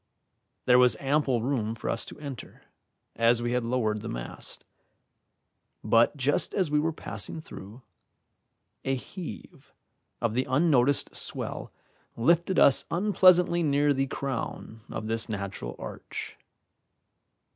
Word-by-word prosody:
There 125 0 +6
was 125 -4 +5
ample 135 -4 +1
room 115 -4 -1
for 115 - -7
us 115 - -1
to - - -10
enter, 140 -4 -9 0.5
as 115 +1 +3
we 120 0 -2
had 125 0 0
lowered 115 -3 -1
the - - -6
mast; - - -6 1.2
but 115 +6 +3
just 140 +2 +1
as 185 -7 +1
we 150 - +3
were 160 +2 0
passing 110 -1 -3
through, 115 -5 -11 1.0
a 135 - 0
heave 155 - -9 0.5
of 115 -2 -1
the 130 +2 0
unnoticed 140 -1 +2
swell - - -3 0.5
lifted 170 +9 +2
us 140 - +6
unpleasantly 180 -2 +4
near 145 -1 +2
the 135 0 0
crown 130 -4 -5
of 110 - -5
this 115 +1 -2
natural 100 - -5
arch. - - -7
130 Hz, 125 wpm, -27 LUFS, 115-150 Hz, 1.2 s, There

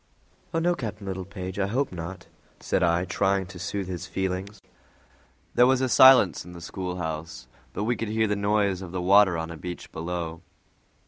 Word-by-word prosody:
"Oh - - -1
no, 175 +2 +2
Captain 105 -8 -6
Littlepage, 95 0 -5
I 95 - +1
hope 130 +7 -1
not," 90 +1 -7 0.3
said - - 0
I, 85 +1 +2
trying 95 +2 +1
to 90 0 -11
soothe 100 +1 -3
his 95 0 -5
feelings. 95 +2 -3 0.9
There 125 - +5
was 130 0 +3
a 130 - +1
silence 130 -7 +6
in 90 - -11
the 85 - -9
schoolhouse, 80 -7 -5 0.3
but 105 - -3
we 120 +3 +1
could 115 -1 -4
hear 110 +1 +1
the 105 -1 0
noise 100 -2 +1
of 90 -2 -8
the 90 - -2
water 95 -1 +5
on 80 0 -4
a 85 - -7
beach 90 +2 -7
below. 85 0 -4
95 Hz, 185 wpm, -26 LUFS, 90-105 Hz, 0.9 s, silence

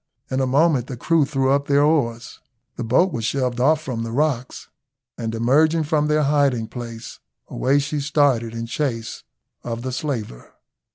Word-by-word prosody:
In 130 - 0
a 130 - +1
moment 140 -2 +2
the 125 - -6
crew 165 +3 +2
threw 135 -1 0
up 140 +1 +1
their 140 0 +4
oars, 125 -7 0 0.4
the 120 - -4
boat 155 +11 +2
was 115 - -3
shoved 125 +1 -1
off 150 +5 +3
from 125 -6 -4
the 115 - -4
rocks, 130 -2 -1 0.5
and 115 -1 -4
emerging 155 +8 +3
from 150 0 +1
their 150 0 +2
hiding 140 -5 +2
place, 115 -1 -8 0.3
away 135 +2 +1
she 145 +1 -1
started 140 -6 +1
in 115 0 -4
chase 115 -2 -3 0.4
of 115 0 -5
the 130 - -3
slaver. 125 - -5
130 Hz, 170 wpm, -22 LUFS, 115-150 Hz, 0.5 s, their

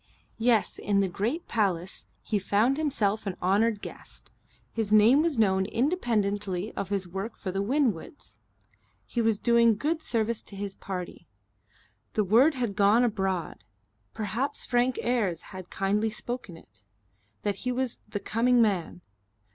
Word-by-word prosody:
Yes, 230 -2 +2
in 200 -1 +1
the 195 - +2
great 225 - -2
palace 190 -5 -1 0.2
he 210 - 0
found 215 +7 +2
himself 220 -9 0
an 190 - -3
honoured 205 +3 +1
guest. - - -10 0.4
His 220 -2 -2
name 220 +7 +6
was 320 -5 0
known 190 -3 +3
independently 210 - -1
of 195 - -4
his 195 -2 -1
work 195 +6 -5
for 190 - -4
the 195 +1 -1
Winwoods. 245 - -2 0.7
He 240 - -2
was 225 -2 +2
doing 235 0 +4
good 315 +8 -1
service 230 -3 -1
to 200 - -9
his 200 0 -4
party. 180 -3 -7 0.9
The 215 - +2
word 245 - +4
had 240 -6 -2
gone 210 +3 +4
abroad 190 - -1 0.5
perhaps 230 +7 -2
Frank 245 0 +1
Ayres 215 -9 0
had 185 -1 -8
kindly 205 +3 0
spoken 240 -5 -6
it 110 - -20 0.6
that 205 -2 -1
he 250 - -2
was 250 -1 -2
the 205 - -3
coming 240 +4 +2
man. 190 -6 +1
215 Hz, 145 wpm, -27 LUFS, 195-240 Hz, 0.9 s, name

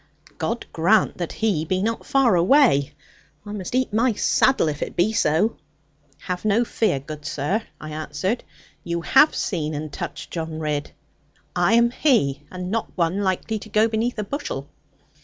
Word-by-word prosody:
God - - -2
grant - - +2
that - - -3
he 205 -8 0
be 185 +4 -1
not 230 +1 -2
far 265 -7 +4
away; 170 - +4 0.5
I 205 - -7
must 205 +2 -5
eat 255 -4 0
my 235 +2 +3
saddle, 255 0 +3
if 150 -1 -3
it - - -4
be 185 +5 +2
so.' 185 +4 +2 0.6
'Have 180 -1 -4
no 215 +3 +2
fear, 220 -11 0
good 150 +2 -9
sir,' 150 +12 -1 0.2
I 155 - -8
answered; 185 +8 -3 0.4
'you 170 0 -2
have 270 - +5
seen 155 -5 -2
and 150 0 -5
touched - - -6
John 160 -2 -4
Ridd. 150 -2 -2 0.7
I 180 +4 +3
am 235 +1 +5
he, 150 - +2
and 180 0 -6
not 225 0 -2
one 170 +2 +1
likely 200 +3 -1
to 215 - -11
go 215 +2 +3
beneath 230 +2 -1
a 210 - -1
bushel.' 200 - -5
190 Hz, 170 wpm, -23 LUFS, 155-225 Hz, 0.7 s, have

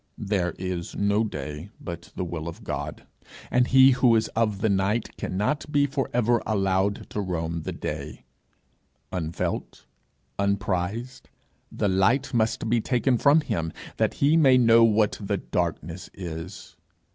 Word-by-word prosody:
There 95 -4 -1
is 90 -2 -4
no 100 +2 +2
day 75 -2 -6
but 85 -2 -8
the - - -2
will 85 -1 -5
of 85 - -8
God, 70 +2 -5 0.5
and 125 0 +3
he 130 0 +7
who 125 -2 +4
is 110 0 +1
of 105 -3 -1
the - - +2
night 100 +3 0
cannot 125 +11 -2
be 145 -1 +3
for 135 -1 -2
ever 120 -1 +2
allowed 95 -1 0
to 105 - -2
roam 85 -3 -3
the - - -4
day; - - -6 0.9
unfelt, 85 -3 -4 0.5
unprized, 100 +4 -1 0.5
the - - -1
light 100 +10 +2
must 115 -1 0
be 115 0 +2
taken 125 +1 +1
from 145 +3 +5
him, 80 - -2 0.3
that - - +1
he 145 +3 +3
may 135 -6 +6
know 115 -2 +6
what 110 -2 +3
the 100 0 -1
darkness 85 -1 -3
is. 85 +1 -7
100 Hz, 145 wpm, -25 LUFS, 90-120 Hz, 0.9 s, he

